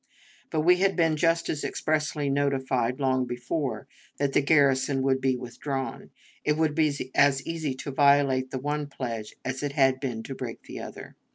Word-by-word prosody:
But 155 - 0
we 180 +3 +5
had 195 +1 +2
been 165 -3 +3
just 165 +2 +2
as 150 - -2
expressly 150 -2 -1
notified, 135 -3 0
long 130 -2 +1
before, 125 0 -3 0.3
that 140 -1 0
the - - +4
garrison 140 -2 +3
would 130 -1 +2
be 130 -1 +2
withdrawn. 135 +2 -5 0.3
It 150 0 +1
would 160 -2 +2
be 150 -4 0
as 140 -1 +3
easy 160 -5 -3
to 140 +2 -6
violate 140 -2 +3
the 130 - -4
one 145 +2 -2
pledge 115 -6 -5
as 130 0 -3
it 145 -1 -2
had 135 -2 +3
been 120 -5 -4
to 135 - -6
break 125 -3 -7
the - - -8
other. - - -9
140 Hz, 180 wpm, -27 LUFS, 130-150 Hz, 0.3 s, we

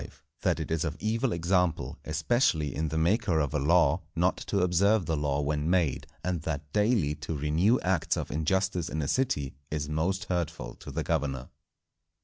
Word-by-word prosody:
—_That - - +1
it - - -4
is 80 -1 +1
of 80 0 -3
evil 115 +3 0
example, 90 -1 0
especially 80 - +1
in 80 +2 -1
the 80 - -3
Maker 90 +2 +2
of 75 -2 -1
a 75 - +1
Law, 80 +1 +3
not - - +2
to - - -1
observe 95 +3 +3
the 80 - 0
Law 75 -1 0
when 75 +2 -1
made: 80 -8 +1 0.2
and 90 -3 -1
that 75 -1 -5
daily 105 -8 +2
to 75 +1 -4
renew 80 - +2
acts 90 -2 +1
of - - -4
injustice 90 +3 0
in 80 -1 -2
a - - -2
City 70 - 0 0.2
is 75 -1 -2
most 90 +6 0
hurtful 85 -9 -3
to - - -11
the - - -3
Governor. 70 -5 -2
80 Hz, 180 wpm, -28 LUFS, 75-90 Hz, 0.2 s, Law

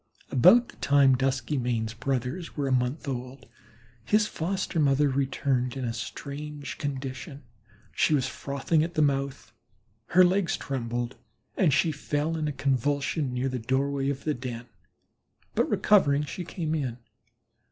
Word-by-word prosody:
About 235 - +6
the - - -15
time 140 -2 +4
Duskymane's 125 -3 -1
brothers 130 +8 -3
were 140 -2 0
a - - -1
month 130 +4 0
old 130 0 -5 0.6
his 210 - +3
foster 185 -1 -2
mother 145 0 +3
returned 135 -1 0
in 130 - -3
a 115 - -2
strange 145 +5 -6
condition. 135 +1 -5 0.5
She 155 - +3
was 130 -3 +1
frothing 140 +4 -1
at 170 +1 -4
the 155 - +4
mouth, 140 -1 -1 0.5
her 185 +2 +6
legs 185 0 +1
trembled, 120 -2 -3 0.4
and 170 -6 +3
she 155 +4 +3
fell 150 +2 -2
in 155 -2 -1
a - - -1
convulsion 140 +1 0
near 125 +1 -1
the 130 -1 -2
doorway 135 +3 0
of 140 -1 -3
the 155 - 0
den, 120 -2 -6 0.9
but - - +1
recovering, 150 -9 +4
she 175 +4 -6
came 160 -2 -3
in. 130 -7 -2
140 Hz, 145 wpm, -27 LUFS, 130-150 Hz, 0.9 s, About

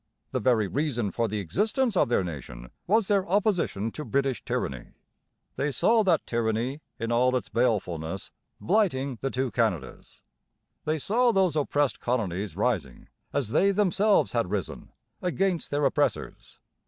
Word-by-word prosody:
The - - 0
very 115 -5 +2
reason 120 - -1
for 115 -1 0
the 105 0 -3
existence 215 - 0
of 175 - +3
their 120 - +2
nation 60 -7 -8 0.2
was 215 +1 +3
their 200 -2 +3
opposition 180 - +1
to 150 - -6
British 135 -3 -1
tyranny. 65 -3 -4 0.6
They 145 +1 0
saw 225 - +3
that 175 -6 +2
tyranny 115 +5 -1 0.2
in 115 +1 -3
all 125 +2 +3
its 125 - -2
balefulness 95 -7 -1 0.3
blighting 140 - +1
the 135 - -1
two 130 -1 -2
Canadas. 100 - -2 0.6
They 155 +1 +1
saw 235 - +2
those 190 -6 +2
oppressed 145 -3 +1
colonies 100 -7 -2
rising, 100 - -2 0.2
as 135 -6 -1
they 195 - +4
themselves 200 +1 +3
had - - 0
risen, - - -4 0.3
against 180 -1 0
their 145 0 0
oppressors. 135 - -1
130 Hz, 145 wpm, -27 LUFS, 110-180 Hz, 0.6 s, they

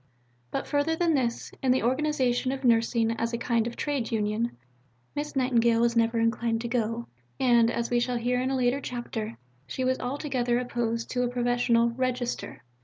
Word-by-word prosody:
But - - -3
further 290 +2 +1
than 335 0 +2
this, 245 -5 -1
in 260 - +3
the 260 - +2
organization 260 -1 +1
of 270 0 -5
nursing 230 -1 +3
as 230 +1 -2
a - - 0
kind 230 -1 0
of 235 - -5
trade 280 -6 -2
union, 220 - -1 0.6
Miss 295 0 -4
Nightingale 235 -3 +3
was 235 0 +2
never 230 0 +2
inclined 230 0 +1
to 235 - -3
go, 235 -1 -1 0.3
and, 235 -3 +4
as 235 0 -2
we 240 - +3
shall 245 0 0
hear 250 +1 0
in 260 - 0
a 270 - 0
later 250 +2 +1
chapter, 230 -3 -5 0.3
she 260 - -3
was 260 0 +1
altogether 250 -2 -1
opposed 235 -2 -2
to 250 - 0
a 250 - +2
professional 240 -1 +2
"register." 250 - -3
240 Hz, 180 wpm, -27 LUFS, 230-255 Hz, 0.6 s, and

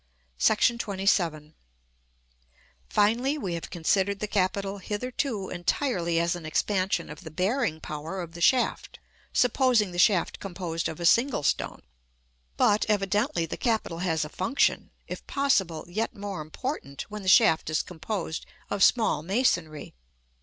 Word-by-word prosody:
§ - - +5
XXVII. 195 -9 +1 1.4
Finally, 235 +8 +2
we 190 -11 -3
have 170 - -5
considered 190 +4 0
the 210 - -1
capital 200 0 -1
hitherto 215 0 -3
entirely 175 -2 0
as 170 +1 +1
an 175 - -8
expansion 185 +2 0
of 150 0 -10
the 160 - -7
bearing 185 - 0
power 155 +5 -6
of 170 -2 -6
the 170 0 -10
shaft, 255 +7 +2 0.3
supposing 245 -5 +3
the 175 - -4
shaft 180 -2 +3
composed 175 -3 -3
of 160 - -7
a 170 - -2
single 235 - +3
stone. - - -1 0.7
But, 210 +1 +3
evidently, 205 - +1
the 165 - -6
capital 220 -8 -1
has 160 -4 0
a - - -8
function, 230 - 0 0.2
if - - -7
possible, 195 - +1
yet 215 +6 -2
more 200 -4 -5
important, 155 - -5
when 210 0 -5
the 190 - -8
shaft 185 -6 +5
is 155 - +1
composed 175 -1 -5 0.2
of 200 -1 +2
small 220 -10 +3
masonry. 170 - 0
190 Hz, 140 wpm, -27 LUFS, 165-215 Hz, 1.4 s, §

